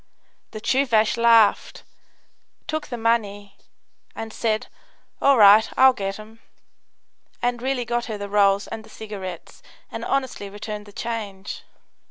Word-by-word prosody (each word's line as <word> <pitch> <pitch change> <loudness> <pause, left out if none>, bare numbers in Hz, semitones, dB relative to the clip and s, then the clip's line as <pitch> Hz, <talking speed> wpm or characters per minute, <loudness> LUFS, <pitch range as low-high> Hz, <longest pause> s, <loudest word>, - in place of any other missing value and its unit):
The 215 - -8
Tchoovash 230 -3 +2
laughed, 230 -2 +3 0.8
took 310 -1 -4
the 245 - -5
money, 205 -3 -1 0.6
and 225 -1 -7
said, 220 -2 -1 0.6
"All 275 -1 +5
right; 210 +1 +7
I'll 265 0 +7
get 195 -4 -4
'em," 220 +1 -13 1.0
and 245 0 -1
really 260 -1 -1
got 240 0 -2
her 215 -2 -5
the 205 0 -6
rolls 200 0 +3
and 220 - -7
the - - -17
cigarettes 195 -5 -8 0.3
and - - -6
honestly 260 -7 -2
returned 210 +1 -7
the - - -12
change. 205 -4 -6
220 Hz, 135 wpm, -23 LUFS, 205-235 Hz, 1.0 s, right